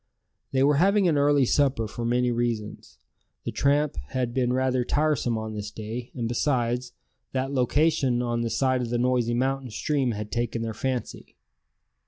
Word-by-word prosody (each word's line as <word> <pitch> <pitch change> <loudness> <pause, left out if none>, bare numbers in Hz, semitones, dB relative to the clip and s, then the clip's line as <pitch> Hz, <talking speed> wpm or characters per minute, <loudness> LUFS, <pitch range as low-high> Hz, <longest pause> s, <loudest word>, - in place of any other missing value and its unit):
They 130 0 +2
were 145 +1 +4
having 195 +3 +4
an 160 - +3
early 145 -1 +4
supper 130 -4 +2
for 120 +2 -6
many 125 +1 +2
reasons. 115 -3 -3 0.5
The - - -3
tramp 145 - +1
had 125 -2 -2
been 125 -1 +1
rather 130 0 +1
tiresome 145 -4 +1
on 110 0 -5
this 105 -1 -5
day; 110 +3 -6
and 120 -2 -2
besides, 120 0 0 0.4
that 135 +1 -1
location 135 -1 +2
on 120 -1 -1
the 115 - -1
side 130 +1 +1
of 120 - -3
the 120 - 0
noisy 120 -1 +1
mountain 135 +1 -1
stream 130 +2 0
had 105 0 -6
taken 120 -1 -1
their 115 -1 -3
fancy. 125 - -4
125 Hz, 170 wpm, -26 LUFS, 120-135 Hz, 0.5 s, were